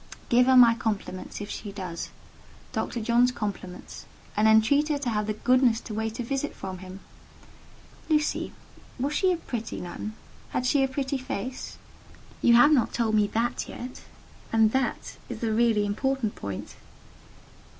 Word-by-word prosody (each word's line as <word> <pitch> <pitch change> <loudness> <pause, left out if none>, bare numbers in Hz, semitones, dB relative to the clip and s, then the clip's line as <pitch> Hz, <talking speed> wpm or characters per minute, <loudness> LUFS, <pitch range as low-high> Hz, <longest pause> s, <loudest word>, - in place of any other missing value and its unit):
"Give 245 0 +5
her 260 -1 +6
my 235 -2 +8
compliments, 210 -5 -4
if 205 - -6
she 205 - -6
does—Dr. 190 +4 -7
John's 240 +3 +3
compliments—and 210 0 -4
entreat 225 +8 +4
her 295 - +1
to 270 -4 -2
have 210 -1 -1
the 215 - -1
goodness 250 0 +3
to 220 - -7
wait 220 +1 -3
a - - -1
visit 275 +4 -2
from 190 -1 -6
him. 185 +1 -10 1.1
Lucy, 305 -1 +1 0.5
was 280 +4 -1
she 370 +4 +3
a 355 - +1
pretty 230 -8 -5
nun? 210 +5 -6 0.3
Had 250 - -2
she 270 +2 +3
a - - +3
pretty 270 0 -2
face? 255 0 -5 0.6
You 235 - +6
have 245 +6 +7
not 270 -6 +3
told 225 -2 0
me 210 -1 +4
that 230 +3 -1
yet; 250 +1 -8 0.5
and 220 -1 +4
that 265 -1 -2
is 235 -2 -5
the 225 -1 0
really 225 -2 +3
important 230 +2 -1
point." 100 -1 -7
230 Hz, 155 wpm, -27 LUFS, 210-260 Hz, 1.1 s, my